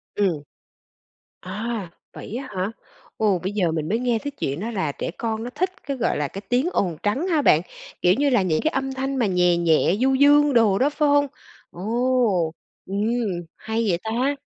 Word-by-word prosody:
Ừm. 185 -8 +1 1.0
À! 210 +1 -4 0.2
Vậy 220 - -8
á 265 +2 -5
hả? 185 +3 -1 0.5
Ồ, 205 -4 +2
bây 185 +3 -3
giờ 190 -5 +1
mình 155 -1 -2
mới 225 +4 +1
nghe 240 -2 +1
cái 285 +5 -5
chuyện 140 - -3
đó 225 +5 -3
là 190 -9 -1
trẻ - - -4
con 225 -1 -2
nó 240 - -4
thích 370 +9 -1
cái, 275 -1 -3
gọi 240 - 0
là, 150 - 0
cái 195 - -8
tiếng 255 +7 +2
ồn 175 - 0
trắng 260 - 0
hả 325 -5 +2
bạn? 155 - +5 0.4
Kiểu 180 - +5
như 285 +1 +2
là 245 -6 +3
những 165 -4 +1
cái 315 - +1
âm 270 0 -2
thanh 270 +1 -2
mà 245 - +2
nhè 180 -2 +3
nhẹ, 170 +1 +3
du 265 +1 +3
dương 290 +1 +5
đồ 220 -5 +4
đó, 275 - +3
phải 295 0 +1
hông? 285 0 +4 0.4
Ồ! 220 -3 +1 0.3
Ừm, 200 +2 -2 0.5
hay 225 +1 -2
vậy 175 - +2
ta! 245 +6 0
225 Hz, 205 wpm, -23 LUFS, 185-265 Hz, 1.0 s, bạn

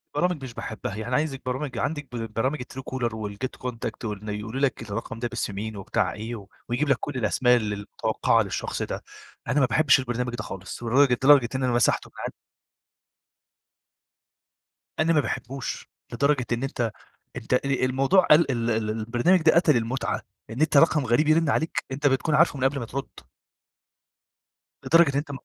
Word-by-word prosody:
برامج 180 -5 0
مش 130 -3 -7
باحبها 110 -4 -5
يعني 115 +4 -3
عايزك 145 -2 -1
برامج 130 +2 -3
عندك 145 -1 -2
ب 115 -2 -5
برامج 130 +6 -1
الTruecaller 130 -2 -4
والGet 110 +3 -5
Contact، 115 -2 -5
وإن 105 0 -5
يقولوا 110 +6 -4
لك 130 -5 +1
الرقم 115 +1 -5
ده 120 - -1
باسم 115 -4 -4
مين 110 +1 -5
وبتاع 95 - -1
إيه، 110 +3 -5
و 100 -3 -10 0.2
ويجيب 135 +5 0
لك 140 - +4
كل 145 - -5
الأسماء 125 +2 +3
ال 105 -3 -2
المتوقعة 100 0 0
للشخص - - -4
ده، - - -4 0.4
أنا 145 - +2
ما 135 - +5
باحبش 140 +3 +4
البرنامج 125 -1 -2
ده - - -5
خالص 95 +5 -8
لدرجة 125 +3 +4
لدرجة 130 -1 +5
إن 130 - -1
أنا 125 -1 +1
مسحته 120 - +2
من - - -16
عندي - - -4 2.7
أنا 160 +1 +3
ما 155 - +4
باحبوش 135 -1 -5 0.2
لدرجة 140 +1 +1
إن 120 - -1
أنت 120 -5 -2 0.4
أنت 120 +1 -2
ال 135 0 +1
الموضوع 135 +9 +3
ال 155 -1 +5
ال 120 -2 0
ال 110 -1 0
البرنامج 120 +11 +2
ده 160 - +5
قتل 165 -5 +4
المتعة، 120 +3 -2 0.3
إن 115 +5 -6
أنت 155 -1 +3
رقم 150 -1 +5
غريب 125 +6 +2
يرِّن 160 0 +4
عليك 160 +2 -1
أنت 140 +2 -1
بتكون 140 +3 +2
عارفُه 155 -1 +4
من 130 - -1
قبل 135 +1 +1
ما 120 - -4
ترد. 135 +4 -5 1.8
لدرجة 165 -1 +5
إن - - -7
أنت 145 +1 -2
125 Hz, 175 wpm, -25 LUFS, 115-145 Hz, 2.7 s, ما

